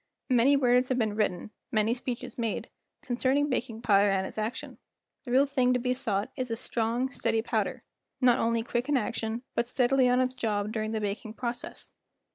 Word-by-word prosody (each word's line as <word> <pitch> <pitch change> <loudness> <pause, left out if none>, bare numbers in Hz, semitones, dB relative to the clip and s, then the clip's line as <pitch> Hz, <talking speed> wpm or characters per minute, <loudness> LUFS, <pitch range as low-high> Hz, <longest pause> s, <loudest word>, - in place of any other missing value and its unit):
Many 255 +3 +5
words 250 -1 +3
have 255 - +1
been 220 -4 0
written, 210 -2 -1 0.2
many 215 +1 +2
speeches 245 -1 -4
made, 230 -3 -3 0.3
concerning 265 +3 +1
baking 235 -2 -3
powder 205 -2 +5
and 190 -1 +1
its 215 - -6
action; 215 +3 -4 0.5
the 245 - -6
real 265 +3 +5
thing 255 -3 +2
to 250 - +1
be 250 +1 0
sought 210 -6 -2
is 255 -2 -3
a 230 - -1
strong, 235 +3 -1
steady 225 -4 0
powder, - - -1 0.4
not 250 -2 +4
only 230 0 +1
quick 240 +3 -2
in 290 - +3
action 230 0 -2
but 235 - 0
steadily 255 +1 +3
on 250 - +3
the 255 - +4
job 220 -5 -2
during 220 -1 -2
the 220 - -1
baking 210 +2 -4
process. 240 0 -5
240 Hz, 190 wpm, -28 LUFS, 220-255 Hz, 0.5 s, Many